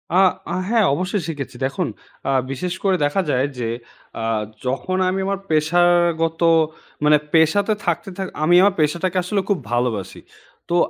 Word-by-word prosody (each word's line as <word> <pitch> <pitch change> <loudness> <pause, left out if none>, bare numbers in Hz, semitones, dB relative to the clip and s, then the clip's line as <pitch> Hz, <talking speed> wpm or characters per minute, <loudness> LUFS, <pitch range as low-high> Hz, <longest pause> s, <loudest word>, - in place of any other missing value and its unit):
আ - - +5 0.4
আ - - -1
হ্যাঁ, 225 -2 +3
অবশ্যই 185 +6 -1
শিখেছি। 145 -5 -5
দেখুন 145 +6 -2 0.4
আ - - +2 0.2
বিশেষ 175 +7 -3
করে 195 -2 +3
দেখা 145 +7 +1
যায় 130 0 +2
যে 115 -2 -2 0.5
আ - - -3 0.4
যখন 135 +9 -1
আমি 190 +1 -1
আমার 200 -1 -1
পেশাগত 165 +1 +2 0.6
মানে 150 0 +6 0.2
পেশাতে 170 +7 +3
থাকতে 175 +2 -1
থা 195 - -2 0.2
আমি 175 +3 +4
আমার 200 0 +4
পেশাটাকে 170 +5 0
আসলে 195 +3 0
খুব 200 - +2
ভালোবাসি। 120 -5 -1 0.5
তো 170 - +1
170 Hz, 155 wpm, -21 LUFS, 145-185 Hz, 0.6 s, মানে